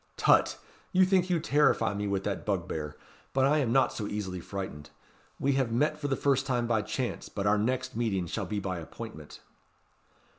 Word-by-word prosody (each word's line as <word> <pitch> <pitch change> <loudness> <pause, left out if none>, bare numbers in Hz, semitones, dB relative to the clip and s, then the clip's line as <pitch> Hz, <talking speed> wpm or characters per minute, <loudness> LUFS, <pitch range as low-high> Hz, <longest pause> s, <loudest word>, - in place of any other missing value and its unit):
"Tut! - - +4 0.4
you 185 0 +6
think 185 -1 +3
to 175 -2 +1
terrify 150 -8 +3
me 100 0 -2
with 100 -1 -1
that 100 - -2
bugbear; 80 -6 -3 0.4
but 135 0 +3
I 150 +3 +4
am 125 -5 +1
not 135 +1 +3
so 105 - -4
easily 95 -3 -3
frightened. 90 -5 -6 0.5
We 140 - +2
have 135 -4 +1
met 150 +6 +1
for 145 - -2
the 135 - +1
first 140 -1 +1
time 120 -3 +1
by 115 -2 +2
chance, 125 +4 -3
but 100 - -4
our 105 +1 +4
next 130 +4 -1
meeting 105 -6 0
shall 95 +3 -3
be 105 +1 -2
by 95 -3 -3
appointment." 80 -2 -9
115 Hz, 190 wpm, -29 LUFS, 100-135 Hz, 0.5 s, you